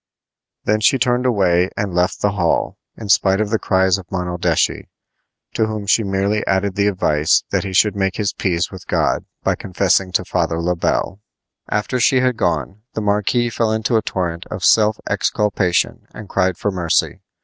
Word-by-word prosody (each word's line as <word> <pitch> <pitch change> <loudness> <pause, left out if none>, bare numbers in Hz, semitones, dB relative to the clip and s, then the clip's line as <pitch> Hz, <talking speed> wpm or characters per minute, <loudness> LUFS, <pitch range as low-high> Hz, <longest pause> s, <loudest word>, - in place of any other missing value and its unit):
Then 105 +1 +1
she 120 +5 +3
turned 125 0 +1
away 95 -6 +2
and 100 -3 -2
left 90 +1 0
the 105 - +3
hall, 90 -5 0 0.2
in 110 - -7
spite 95 +1 +3
of 105 -1 -1
the 110 - +1
cries 95 -1 +2
of 90 - -13
Monaldeschi, 90 -2 -1 0.7
to 110 -1 +1
whom 110 -2 -4
she 105 - +3
merely 100 +2 0
added 95 +1 +1
the 100 +1 +1
advice 80 -6 +2
that - - 0
he 100 - -5
should 100 +2 +3
make 95 -2 -1
his 105 -2 -1
peace 85 -3 -1
with 95 -1 -11
God - - 0 0.2
by - - +2
confessing 95 0 0
to - - +1
Father 80 - -1
Le 90 +1 0
Bel. 95 +3 -1 0.5
After 105 +5 -1
she 130 +2 +3
had 125 -1 +1
gone 105 -1 -2
the 110 - -3
marquis 105 +4 +1
fell 115 -1 0
into 110 +2 0
a 110 - +3
torrent 85 -5 -4
of - - -4
self 110 -1 +4
exculpation 100 -4 0
and 110 - -9
cried 95 -2 0
for 105 - -1
mercy. 90 -3 0
100 Hz, 180 wpm, -19 LUFS, 90-110 Hz, 0.7 s, self